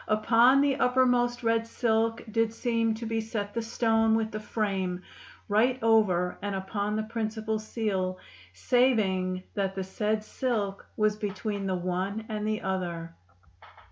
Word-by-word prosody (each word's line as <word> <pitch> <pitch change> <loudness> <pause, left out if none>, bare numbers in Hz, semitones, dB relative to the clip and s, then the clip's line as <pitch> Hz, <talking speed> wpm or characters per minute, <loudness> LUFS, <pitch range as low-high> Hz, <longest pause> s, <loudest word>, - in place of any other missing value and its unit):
Uppon 230 +5 +5
the 280 -1 +2
uppermost 245 -1 +2
red 230 0 +1
silk 225 0 0
did 225 0 +2
seme 230 -1 0
to 230 +1 -6
be 225 0 -1
set 210 -2 -4
the 230 - -1
stone 225 -1 +2
with 225 -1 0
the 215 - -4
frame, 195 -4 -2 0.4
right 230 +5 +3
over 195 -6 +3
and 200 -1 -2
uppon 200 +2 -2
the 215 - -1
principal 220 0 -3
seal, 200 -4 -2 0.3
saving 190 - +1
that 195 -1 -1
the 190 - -2
sayd 210 +3 -1
sylk 215 -5 -2 0.2
was 215 -1 +2
betwene 205 -1 -3
the 190 - 0
one 185 +4 -2
and 210 -1 -2
the 215 0 -2
other." 170 -3 -3
215 Hz, 145 wpm, -28 LUFS, 195-230 Hz, 0.4 s, Uppon